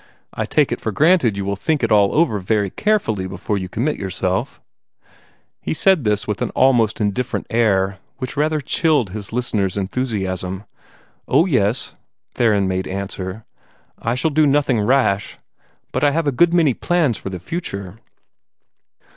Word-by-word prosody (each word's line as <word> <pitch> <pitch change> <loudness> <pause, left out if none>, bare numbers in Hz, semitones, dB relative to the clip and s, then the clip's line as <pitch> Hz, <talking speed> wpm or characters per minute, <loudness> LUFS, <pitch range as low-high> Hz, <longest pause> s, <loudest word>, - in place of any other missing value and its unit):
I - - -3
take - - +2
it - - -3
for 110 - -2
granted 145 - +3
you 100 - -3
will 100 0 -1
think 145 +7 -1
it 115 - +1
all 100 -2 +5
over 150 -10 +2
very 100 0 0
carefully 115 - 0
before 95 +3 -3
you 95 -1 -5
commit 130 +11 -1
yourself." 95 -1 -2 1.0
He - - -2
said 190 -3 +3
this 105 -1 +1
with 105 -2 -3
an - - 0
almost 120 -5 +3
indifferent 105 +3 -1
air, 100 -4 +1 0.2
which 130 0 -5
rather 155 +1 +1
chilled 145 - +1
his 105 0 -6
listener's 105 -6 -1
enthusiasm. 95 -3 -3 0.6
"Oh, 150 +6 +4
yes,", 120 - +1 0.4
Theron 105 -5 +2
made 95 0 -2
answer; 95 +2 -5 0.5
"I 115 +2 -1
shall 155 +5 0
do 155 +1 +3
nothing 140 -4 +2
rash. 105 -4 +1 0.5
But - - -2
I 145 - +6
have 160 +3 -1
a 145 - +2
good 165 +7 +3
many 165 -6 +3
plans 155 -5 0
for - - -6
the 95 - -5
future." 100 - -6
110 Hz, 160 wpm, -20 LUFS, 100-145 Hz, 1.0 s, I